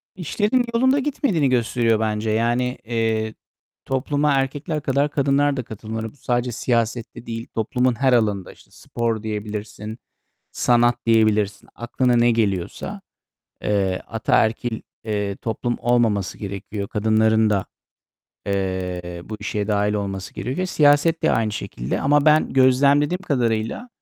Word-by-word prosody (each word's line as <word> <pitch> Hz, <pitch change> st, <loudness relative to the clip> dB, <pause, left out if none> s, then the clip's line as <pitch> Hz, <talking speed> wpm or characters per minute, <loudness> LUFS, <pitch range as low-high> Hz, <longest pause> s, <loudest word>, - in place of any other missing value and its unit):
İşlerin 210 Hz, -, 0 dB
yolunda 260 Hz, +4 st, +3 dB
gitmediğini 255 Hz, -, +1 dB
gösteriyor 115 Hz, -2 st, +2 dB
bence. 110 Hz, 0 st, -1 dB
Yani, 120 Hz, +3 st, +1 dB
eee, 110 Hz, -1 st, -1 dB, 0.5 s
topluma 145 Hz, +3 st, 0 dB
erkekler 140 Hz, +3 st, -1 dB
kadar 140 Hz, +1 st, +1 dB
kadınlar 140 Hz, -1 st, +2 dB
da 130 Hz, -, -2 dB
katılmalı. 110 Hz, 0 st, -6 dB
Bu -, -, -24 dB
sadece 125 Hz, -1 st, -1 dB
siyasette 115 Hz, 0 st, -2 dB
değil, 115 Hz, 0 st, -5 dB
toplumun 125 Hz, +3 st, +1 dB
her 130 Hz, -1 st, +3 dB
alanında. 105 Hz, -5 st, +1 dB
İşte -, -, -20 dB
spor 115 Hz, -2 st, -3 dB
diyebilirsin, 105 Hz, 0 st, -5 dB, 0.6 s
sanat 120 Hz, 0 st, +3 dB
diyebilirsin, 110 Hz, -3 st, +2 dB
aklına 120 Hz, +1 st, 0 dB
ne 120 Hz, 0 st, +4 dB
geliyorsa. 100 Hz, -6 st, -1 dB, 0.6 s
Eee, 95 Hz, -3 st, 0 dB
ataerkil, 110 Hz, +1 st, 0 dB, 0.2 s
eee, 105 Hz, -2 st, -2 dB
toplum 120 Hz, +1 st, -2 dB
olmaması 110 Hz, -7 st, +1 dB
gerekiyor. 100 Hz, 0 st, -5 dB
Kadınların 110 Hz, +1 st, +2 dB
da, 100 Hz, -2 st, 0 dB, 0.8 s
eee, 90 Hz, -3 st, -3 dB
bu 110 Hz, -, -6 dB
işe 105 Hz, 0 st, -3 dB
dâhil 105 Hz, 0 st, +1 dB
olması 95 Hz, -2 st, -4 dB
gerekiyor. 135 Hz, +10 st, -2 dB
Siyaset 150 Hz, 0 st, +3 dB
de -, -, +3 dB
aynı 110 Hz, -2 st, +1 dB
şekilde. 65 Hz, -, -4 dB
Ama 145 Hz, +1 st, +3 dB
ben 155 Hz, 0 st, +4 dB
gözlemlediğim 140 Hz, +6 st, +3 dB
kadarıyla 120 Hz, -, -1 dB
115 Hz, 125 wpm, -22 LUFS, 105-135 Hz, 0.8 s, ne